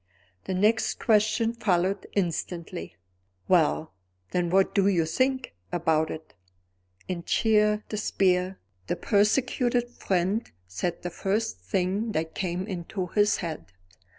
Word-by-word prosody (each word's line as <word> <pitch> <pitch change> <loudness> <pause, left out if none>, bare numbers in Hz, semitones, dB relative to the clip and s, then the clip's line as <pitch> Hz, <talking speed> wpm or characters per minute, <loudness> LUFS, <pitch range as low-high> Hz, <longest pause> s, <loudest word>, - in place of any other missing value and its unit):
The 190 - -2
next 215 +4 +2
question 220 +1 +2
followed 195 -4 0
instantly: 170 - -3 0.5
"Well, 160 - +2 0.4
then, 175 -1 0
what 190 +2 +3
do 195 -1 +3
you 175 -5 +3
think 255 +10 0 0.2
about 160 -2 +1
it?" 160 0 -8 0.7
In 175 -2 -3
sheer 210 0 +3
despair, 190 -3 +1 0.3
the - - 0
persecuted 240 +3 +1
friend 195 +2 -1 0.2
said 165 - -3
the 175 - -3
first 200 - -1
thing 185 - -1
that 160 +1 -2
came 180 0 -2
into 185 -1 -4
his 210 0 +3
head. 155 - -6
190 Hz, 120 wpm, -27 LUFS, 170-215 Hz, 0.7 s, what